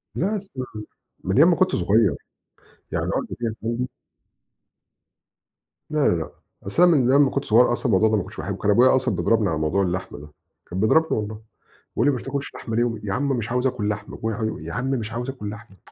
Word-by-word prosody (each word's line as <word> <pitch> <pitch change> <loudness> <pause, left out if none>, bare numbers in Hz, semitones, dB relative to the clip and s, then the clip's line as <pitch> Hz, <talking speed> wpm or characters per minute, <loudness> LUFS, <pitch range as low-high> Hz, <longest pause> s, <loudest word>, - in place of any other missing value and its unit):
لأ 205 +5 0
أصل 160 -10 -7 0.6
من 95 - 0
أيام 160 +6 +7
ما 170 - +3
كُنت 185 0 +2
صغير، 100 +3 +3 0.8
يعني - - -1
العقدة - - -2
دِيَّة 115 -2 -2
عندي 125 +2 -2 2.0
لا، 150 -2 +2
لا، - - +2
لأ، 80 - -4 0.3
أصل 100 - +2
أنا 180 - +7
من 130 -3 +3
أيّام 140 +1 +6
ما 130 - -1
كٌنت 140 0 -2
صغيّر 120 +2 +4
أصلًا 125 - -5
الموضوع 110 -1 +4
ده 110 - +2
ما 95 - -1
كُنتش - - -12
باحبه، - - -4
كان 105 - +1
أبويا 125 +5 +5
أصلًا 130 -6 0
بيضربني 100 +3 +2
على 80 - -1
موضوع 80 +6 +1
اللحمة 90 -4 -3
ده، 75 +1 -12 0.4
كان 90 +2 -4
بيضربني 160 +9 +3
والله، 105 0 -6 0.5
بيقول 120 - +2
لي - - +5
ما - - -2
بتاكلش 140 0 -4
لحمة 115 - -5
ليه 120 - +3
وم 115 -3 -2
يا 100 -2 -2
عم 140 +5 0
مش 115 -4 -1
عاوز 125 +1 +1
آكل 115 -5 -2
لحمة 105 0 -5
ويقع 110 0 -2 0.2
يا 80 +1 -7
عم 125 +4 -2
مش 115 -5 -2
عاوز 120 +3 -4
آكل 105 -6 -5
لحمة، 105 -2 -11
115 Hz, 220 wpm, -23 LUFS, 105-130 Hz, 2.0 s, أيام